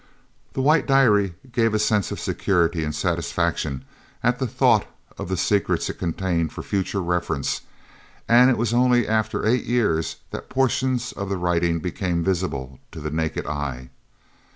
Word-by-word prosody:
The 130 Hz, -, -1 dB
white 150 Hz, +3 st, +3 dB
diary 105 Hz, -9 st, +4 dB, 0.2 s
gave 115 Hz, -3 st, +2 dB
a -, -, +4 dB
sense 105 Hz, -1 st, +1 dB
of -, -, -4 dB
security 85 Hz, -3 st, 0 dB
and 75 Hz, 0 st, -3 dB
satisfaction 65 Hz, -1 st, -1 dB, 0.4 s
at 125 Hz, 0 st, +2 dB
the 130 Hz, -, 0 dB
thought -, -, +3 dB, 0.3 s
of -, -, -5 dB
the 95 Hz, -, -1 dB
secrets 100 Hz, +3 st, +1 dB
it -, -, -15 dB
contained 85 Hz, -2 st, -1 dB
for -, -, -7 dB
future 100 Hz, 0 st, -1 dB
reference, 85 Hz, -5 st, -1 dB, 0.7 s
and 120 Hz, +2 st, +6 dB
it 125 Hz, -, +2 dB
was 115 Hz, 0 st, 0 dB
only 125 Hz, -1 st, +3 dB
after 110 Hz, -1 st, 0 dB
eight 120 Hz, +2 st, +2 dB
years 105 Hz, -10 st, +1 dB, 0.2 s
that -, -, -7 dB
portions 130 Hz, -1 st, 0 dB
of 100 Hz, -1 st, -5 dB
the 100 Hz, -, -1 dB
writing 85 Hz, -1 st, +1 dB
became 90 Hz, 0 st, -2 dB
visible 80 Hz, -9 st, -2 dB
to -, -, -8 dB
the 75 Hz, 0 st, -4 dB
naked 80 Hz, 0 st, -2 dB
eye. 70 Hz, -4 st, -4 dB
95 Hz, 160 wpm, -23 LUFS, 85-120 Hz, 0.7 s, and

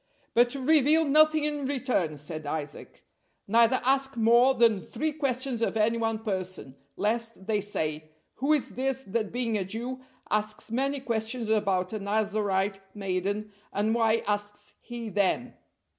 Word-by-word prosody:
"But 240 Hz, +2 st, +3 dB
reveal 305 Hz, +3 st, +4 dB
nothing 310 Hz, +1 st, +4 dB
in 295 Hz, -2 st, -1 dB
return," 250 Hz, -, -1 dB
said 155 Hz, +1 st, -5 dB
Isaac, 150 Hz, -1 st, -6 dB, 0.4 s
"neither 230 Hz, +4 st, +4 dB
ask 270 Hz, 0 st, +1 dB
more 235 Hz, +4 st, +5 dB
than 230 Hz, -5 st, +4 dB
three 315 Hz, +1 st, -2 dB
questions 265 Hz, -4 st, -1 dB
of 225 Hz, -, 0 dB
any 225 Hz, +2 st, +2 dB
one 225 Hz, -1 st, 0 dB
person, 185 Hz, -, -4 dB, 0.2 s
lest 225 Hz, -1 st, -1 dB
they 210 Hz, -1 st, 0 dB
say, 155 Hz, -6 st, -3 dB, 0.3 s
'Who 275 Hz, +3 st, 0 dB
is 300 Hz, -3 st, +2 dB
this 265 Hz, 0 st, -2 dB
that 215 Hz, 0 st, -2 dB
being 230 Hz, -3 st, -1 dB
a -, -, -1 dB
Jew 240 Hz, +7 st, -4 dB, 0.3 s
asks 215 Hz, +1 st, -1 dB
many 275 Hz, +3 st, 0 dB
questions 225 Hz, -1 st, -1 dB
about 195 Hz, -3 st, +1 dB
a 215 Hz, -, -2 dB
Nazarite 200 Hz, -1 st, 0 dB, 0.2 s
maiden, 200 Hz, +2 st, -2 dB, 0.2 s
and 210 Hz, +2 st, 0 dB
why 225 Hz, -1 st, +2 dB
asks 205 Hz, 0 st, -3 dB
he 235 Hz, -2 st, -6 dB
them?'" 205 Hz, +4 st, 0 dB
225 Hz, 145 wpm, -28 LUFS, 205-255 Hz, 0.4 s, more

